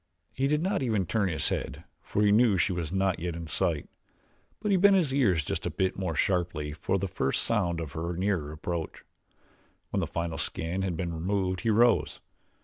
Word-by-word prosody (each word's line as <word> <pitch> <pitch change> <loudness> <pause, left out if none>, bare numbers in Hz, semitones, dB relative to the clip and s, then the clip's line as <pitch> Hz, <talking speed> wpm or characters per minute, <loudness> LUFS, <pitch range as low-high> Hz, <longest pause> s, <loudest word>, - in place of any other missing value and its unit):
He 135 - 0
did 150 +2 +1
not 195 -1 0
even 110 -7 +1
turn 100 +2 0
his 80 -4 +1
head 70 +6 -4 0.2
for 105 - -1
he 105 - +5
knew 110 -2 +4
she 90 +2 +2
was 85 -3 -3
not 95 -1 +1
yet 85 -1 -3
in 85 0 -6
sight; 80 - -1 0.7
but 210 - -1
he - - +5
bent 200 +2 +6
his 160 -8 +2
ears 95 - +2
just - - -2
a - - 0
bit 95 -1 -1
more 90 -4 -3
sharply 85 -4 0
for 95 - -1
the 100 +1 -2
first 70 -6 0
sound 90 -7 0
of 80 -4 -5
her 85 +1 -4
nearer 90 -6 -1
approach. 80 +1 -5 0.9
When - - 0
the - - -1
final 85 -1 -3
skin 85 +4 -2
had 90 -4 -2
been 85 -1 -3
removed 95 +2 -1
he 115 - 0
rose. 115 +2 +3
95 Hz, 205 wpm, -28 LUFS, 85-105 Hz, 0.9 s, bent